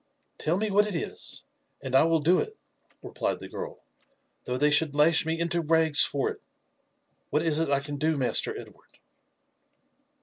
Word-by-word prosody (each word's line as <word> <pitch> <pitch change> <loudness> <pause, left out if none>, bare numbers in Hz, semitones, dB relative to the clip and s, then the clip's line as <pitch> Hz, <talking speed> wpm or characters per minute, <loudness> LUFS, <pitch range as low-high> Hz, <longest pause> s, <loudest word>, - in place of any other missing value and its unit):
" - - -45
Tell 165 +3 0
me 215 +1 -1
what 205 +2 +3
it 205 - -4
is, 165 - -4 0.4
and 130 - -7
I 135 - +6
will 165 0 +3
do 165 +4 +3
it," 435 0 -4 0.5
replied - - -3
the - - -10
girl, 485 +1 -6
•* - - -30 0.7
though 125 - -2
they 150 +2 +3
should 150 -1 +2
lash 155 +2 +3
me 165 0 -1
into 170 0 0
rags 160 -3 +4
for 140 0 +1
it. - - -11 0.9
What 150 - 0
is 160 -2 +1
it 165 - 0
I 140 -1 +2
can 145 0 -6
do, 155 +1 0
Master 130 -2 0
Edward?" - - -16
160 Hz, 190 wpm, -27 LUFS, 145-170 Hz, 0.9 s, I